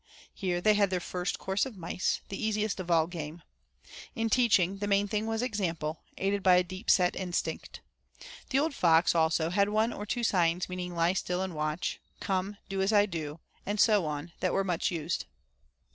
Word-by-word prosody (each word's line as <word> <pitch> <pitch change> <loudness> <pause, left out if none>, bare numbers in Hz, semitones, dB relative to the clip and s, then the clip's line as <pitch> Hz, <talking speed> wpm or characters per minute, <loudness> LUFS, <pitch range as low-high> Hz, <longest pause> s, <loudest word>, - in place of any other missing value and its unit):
Here 180 -2 -2
they 215 +3 +5
had 205 -2 +3
their 185 -1 0
first 180 +1 -3
course 190 +1 -1
of 255 -6 -5
mice, 180 +1 -1
the 195 - -5
easiest 215 -1 0
of 180 -1 -5
all 165 -2 +4
game. 165 -1 -7 0.7
In 225 -2 -1
teaching, 200 -6 +3
the 205 - -2
main 200 0 +2
thing 215 +1 -1
was 225 +1 -1
example, 170 -9 -2 0.2
aided 200 +1 0
by 185 -1 +6
a 180 - +4
deep 185 +4 -7
set 180 -3 +4
instinct. 180 -2 -3 0.7
The 270 - +1
old 300 +2 +1
fox, 165 -8 +4
also, 160 0 +2
had 200 +2 +2
one 220 +2 +1
or 210 - -6
two 240 +3 -2
signs 175 -4 +2
meaning 180 -1 -5
"lie 170 +1 +2
still 180 -1 -1
and 190 -2 -4
watch," 155 +2 -2 0.2
"come, 195 +1 -2
do 195 0 -2
as 195 +2 +2
I 205 -1 +5
do," 160 -4 -5 0.2
and 205 +1 -3
so 210 -6 +4
on, 150 +3 -4
that 185 - 0
were 195 - +2
much 175 -3 0
used. 165 0 -2
185 Hz, 195 wpm, -29 LUFS, 170-205 Hz, 0.7 s, by